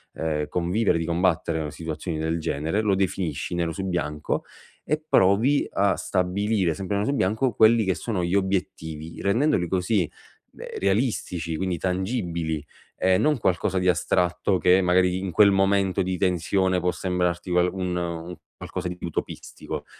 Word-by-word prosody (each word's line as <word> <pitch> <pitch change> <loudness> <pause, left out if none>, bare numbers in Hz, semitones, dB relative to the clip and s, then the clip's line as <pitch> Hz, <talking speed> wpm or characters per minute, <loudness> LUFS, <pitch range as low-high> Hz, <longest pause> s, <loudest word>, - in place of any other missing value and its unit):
ehm, 75 -2 -2
convivere, 90 +2 +1
di 80 - -2
combattere 85 -2 0
con 75 -2 -4
situazioni 80 +1 -5
del 80 +1 -1
genere; 80 +6 -1
lo 105 -2 +1
definisci 90 -4 -2
nero 85 -1 -1
su 95 +4 -4
bianco, 75 -5 -2 0.4
e 155 +1 -1
provi 110 +9 +3
a 100 0 +2
stabilire, 95 -1 0
sempre 95 +4 -2
nero 105 - -1
su 140 - +1
bianco, 110 +3 +1
quelli 110 0 +5
che 95 - +1
sono 105 -6 -2
gli 85 +3 0
obiettivi, 80 -5 -2
rendendoli 100 - +2
così, 90 -1 0 0.4
beh, - - -9
realistici, 95 - -1
quindi 95 -2 -1
tangibili, 90 - -2 0.3
e 95 0 +3
non 150 -2 +2
qualcosa 95 0 0
di 90 - 0
astratto, 90 +2 +1
che 90 +1 +5
magari 90 0 +2
in 95 0 -3
quel 100 +3 +6
momento 95 0 +2
di 90 0 -2
tensione 95 +1 +1
può 90 - +1
sembrarti 90 -1 -2
qual 90 0 +3
un 90 -1 -3
un 85 0 -4 0.2
qualcosa 90 -1 -5
di 90 - -6
utopistico. 85 - -5
90 Hz, 155 wpm, -25 LUFS, 85-100 Hz, 0.4 s, quel